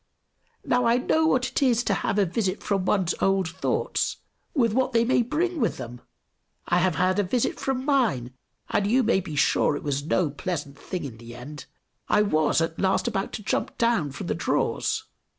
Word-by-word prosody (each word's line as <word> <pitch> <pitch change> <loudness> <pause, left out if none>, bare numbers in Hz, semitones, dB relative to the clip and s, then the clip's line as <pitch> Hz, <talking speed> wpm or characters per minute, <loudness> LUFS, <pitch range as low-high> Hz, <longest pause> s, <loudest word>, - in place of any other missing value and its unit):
Now, 245 0 +2
I 235 +1 +4
know 315 +5 +2
what 260 -4 +2
it - - -1
is 245 -3 +3
to 205 - +1
have 200 - -1
a 205 - +4
visit 185 +1 -2
from 195 -2 0
one's 185 -3 +1
old 195 -2 +2
thoughts, 185 +3 -1 0.4
with 230 -6 +2
what 260 +1 +1
they 230 0 +3
may 245 0 +3
bring 320 +8 -1
with 230 - 0
them! 120 -1 -8 0.7
I 175 - +3
have 180 -2 +1
had 185 +2 +2
a - - +3
visit 230 +6 -1
from 265 -1 -2
mine, 215 - +1 0.4
and 200 - +1
you 250 +5 +3
may 220 -3 +3
be 170 -5 -6
sure 145 0 +2
it - - -9
is 140 0 -1
no 160 0 +1
pleasant 145 -3 -5
thing 185 -2 -5
in 125 -6 -7
the 120 0 -10
end; 145 +4 -9 0.4
I 210 - +4
was 155 -6 +2
at 165 0 -2
last 190 -1 +1
about 195 +1 -2
to 215 - -5
jump - - -2
down 230 -11 +1
from 130 - -7
the - - -1
drawers. - - 0
195 Hz, 205 wpm, -25 LUFS, 155-235 Hz, 0.7 s, I